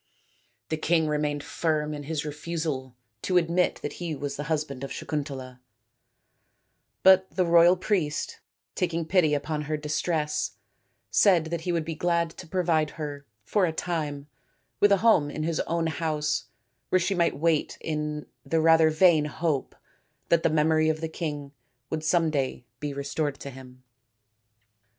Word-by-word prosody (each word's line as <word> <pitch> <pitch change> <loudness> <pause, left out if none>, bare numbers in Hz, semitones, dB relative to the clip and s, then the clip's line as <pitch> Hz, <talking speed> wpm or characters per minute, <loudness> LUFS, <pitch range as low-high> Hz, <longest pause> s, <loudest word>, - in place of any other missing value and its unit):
The 160 - -1
king 160 +1 +2
remained 150 -1 -1
firm 155 -2 -1
in 145 - -5
his 155 -1 -2
refusal 150 -4 -4 0.3
to 185 - +1
admit 175 +1 +2
that - - -3
he 165 -3 -2
was 140 0 -4
the 145 - -5
husband 150 -4 -2
of 135 - -4
Sakuntala, 135 -4 -5 1.4
but 190 0 +6
the 180 +3 0
royal 170 +1 +6
priest, 175 -6 -1 0.3
taking 170 -2 -1
pity 160 -3 +3
upon 150 +1 -3
her 155 - 0
distress, 150 +1 -1 0.6
said 180 -6 +5
that 170 -1 -2
he 175 - -2
would 165 -2 -1
be 165 - -3
glad 170 0 0
to 175 - -11
provide 165 -3 +1
her, 145 -2 -6 0.2
for 200 -4 +2
a - - -1
time, 155 -4 -3 0.5
with 205 - +5
a 200 - +6
home 170 -11 +5
in 155 +1 -4
his 165 0 -1
own 170 0 0
house 155 -1 -1 0.4
where - - +4
she 185 +2 +1
might 175 -2 +1
wait 160 0 +1
in 150 -1 -3 0.2
the 165 - 0
rather 160 0 +6
vain 155 -1 +4
hope 150 -2 -2 0.5
that 170 -1 +4
the - - +2
memory 155 +1 +3
of 155 0 0
the 160 0 -3
king 145 -4 -4 0.4
would 155 -1 -2
some 165 0 +2
day 135 -4 -2
be 145 -1 -3
restored 140 +1 -3
to 140 - -7
him. 130 -1 -13
155 Hz, 160 wpm, -27 LUFS, 150-170 Hz, 1.4 s, but